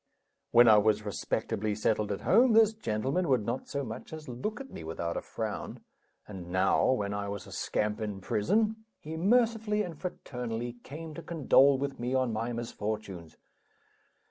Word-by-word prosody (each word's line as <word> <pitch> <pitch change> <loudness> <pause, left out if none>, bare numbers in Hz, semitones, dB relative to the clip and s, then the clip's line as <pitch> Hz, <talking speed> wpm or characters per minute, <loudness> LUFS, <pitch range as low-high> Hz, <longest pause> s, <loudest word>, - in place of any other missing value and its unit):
When 120 0 +7
I 110 -2 +8
was 105 0 +2
respectably 105 +1 -2
settled 105 0 0
at 100 - -3
home, 235 +3 +5
this 220 -1 +6
gentleman 135 - -1
would 125 -6 +2
not 120 +4 -3
so 140 0 -3
much 115 -1 -7
as 155 -1 -8
look 130 - -4
at 270 0 -9
me - - -8
without 85 +1 -3
a - - -2
frown; - - -5 0.5
and 95 -4 -8
now, 95 +1 +3
when 100 -6 -1
I 100 0 -3
was 100 -1 -5
a - - -12
scamp, 105 +1 -1
in 105 -2 -3
prison, 210 - +1 0.2
he 155 +1 -7
mercifully 220 +2 +2
and 175 -4 -6
fraternally 120 -8 -5
came 155 +3 -8
to 170 - -7
condole 140 -4 +4
with 140 0 -3
me 125 +2 -1
on 130 -3 +1
my 115 +2 -2
misfortunes. 105 -7 -5
120 Hz, 170 wpm, -30 LUFS, 105-165 Hz, 0.5 s, I